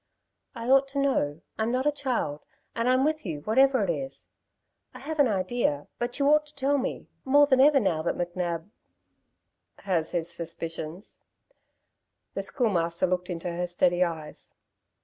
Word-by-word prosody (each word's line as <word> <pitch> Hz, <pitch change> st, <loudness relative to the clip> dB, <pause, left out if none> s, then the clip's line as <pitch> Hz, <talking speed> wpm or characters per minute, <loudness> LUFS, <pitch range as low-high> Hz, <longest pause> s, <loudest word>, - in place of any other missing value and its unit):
"I 230 Hz, +1 st, -6 dB
ought 270 Hz, +1 st, +5 dB
to 275 Hz, +1 st, -3 dB
know. 165 Hz, -, 0 dB, 0.2 s
I'm 220 Hz, +1 st, +1 dB
not 255 Hz, +2 st, 0 dB
a 295 Hz, -, +4 dB
child, 245 Hz, -, -2 dB, 0.3 s
and 230 Hz, +1 st, +1 dB
I'm 255 Hz, +2 st, +3 dB
with 310 Hz, 0 st, 0 dB
you 155 Hz, -6 st, -5 dB
whatever 260 Hz, -, +3 dB
it -, -, -2 dB
is. 270 Hz, 0 st, -6 dB, 0.7 s
I -, -, -8 dB
have 310 Hz, +3 st, -6 dB
an 285 Hz, -, +6 dB
idea; 185 Hz, -7 st, 0 dB
but 240 Hz, 0 st, -2 dB
you 280 Hz, -, +2 dB
ought 300 Hz, 0 st, +4 dB
to 300 Hz, -, -21 dB
tell 280 Hz, +1 st, +1 dB
me, 265 Hz, -, -4 dB, 0.2 s
more 290 Hz, +2 st, +5 dB
than 265 Hz, -2 st, +4 dB
ever 285 Hz, 0 st, +6 dB
now 170 Hz, -8 st, 0 dB
that 170 Hz, -, -2 dB
McNab 175 Hz, -1 st, -3 dB, 0.6 s
" -, -, -52 dB
"Has 165 Hz, -4 st, +1 dB
his 170 Hz, -2 st, -1 dB
suspicions." 165 Hz, +1 st, -5 dB, 1.1 s
The -, -, -2 dB
Schoolmaster 175 Hz, -, 0 dB
looked 180 Hz, 0 st, -1 dB
into 175 Hz, 0 st, -4 dB
her 175 Hz, +1 st, -2 dB
steady 175 Hz, 0 st, +2 dB
eyes. 160 Hz, -3 st, -5 dB
205 Hz, 170 wpm, -27 LUFS, 170-270 Hz, 1.1 s, an